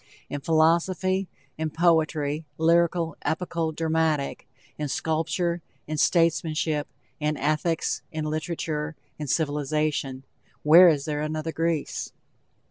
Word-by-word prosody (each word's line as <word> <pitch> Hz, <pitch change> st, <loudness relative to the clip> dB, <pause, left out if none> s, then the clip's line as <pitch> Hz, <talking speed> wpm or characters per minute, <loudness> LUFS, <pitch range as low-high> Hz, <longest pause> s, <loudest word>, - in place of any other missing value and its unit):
In 145 Hz, -, -3 dB
philosophy, 170 Hz, +5 st, +2 dB, 0.3 s
in 160 Hz, 0 st, -1 dB
poetry, 155 Hz, -2 st, +1 dB
lyrical, 170 Hz, 0 st, +2 dB
epical, 165 Hz, +1 st, -1 dB
dramatic, 160 Hz, -2 st, 0 dB, 0.3 s
in 150 Hz, -, -3 dB
sculpture, 165 Hz, +4 st, -1 dB, 0.2 s
in 155 Hz, 0 st, -3 dB
statesmanship, 160 Hz, -3 st, +2 dB, 0.3 s
in 150 Hz, 0 st, 0 dB
ethics, 155 Hz, +3 st, 0 dB
in 155 Hz, -1 st, -3 dB
literature, 155 Hz, 0 st, -3 dB, 0.2 s
in 150 Hz, -, -4 dB
civilization, 145 Hz, -2 st, -1 dB, 0.4 s
where 170 Hz, +4 st, +9 dB
is 145 Hz, -4 st, +1 dB
there 150 Hz, -1 st, -2 dB
another 155 Hz, +1 st, -2 dB
Greece? 165 Hz, -2 st, -2 dB
160 Hz, 105 wpm, -26 LUFS, 150-165 Hz, 0.4 s, where